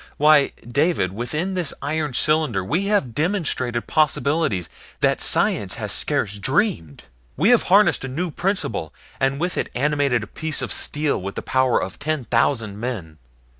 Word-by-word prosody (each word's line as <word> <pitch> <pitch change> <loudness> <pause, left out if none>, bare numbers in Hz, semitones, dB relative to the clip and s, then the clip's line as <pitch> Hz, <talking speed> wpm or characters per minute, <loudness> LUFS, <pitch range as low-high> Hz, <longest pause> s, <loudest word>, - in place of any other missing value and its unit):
Why, 150 -1 +5 0.2
David 140 - +1
within 150 - -3
this 180 -5 -2
iron 150 -2 -2
cylinder 150 -12 +1
we 170 - -1
have 200 - +1
demonstrated 145 - -1
possibilities 150 - +1 0.3
that - - +2
science - - +2
has - - -4
scarce 105 0 -1
dreamed. 135 - 0 0.3
We 175 - +3
have 245 -2 +6
harnessed 200 -3 +4
a - - -3
new 165 +7 -3
principle, 150 - -2 0.2
and 135 +1 0
with 180 +2 -1
it - - -2
animated 140 -3 +1
a - - -5
piece 155 +8 -3
of - - -1
steel 145 -7 0
with 100 +2 -6
the - - -5
power 130 -1 +2
of 95 - -6
ten 150 -3 -2
thousand 115 -4 0
men. 95 -11 -5
140 Hz, 160 wpm, -22 LUFS, 120-160 Hz, 0.3 s, have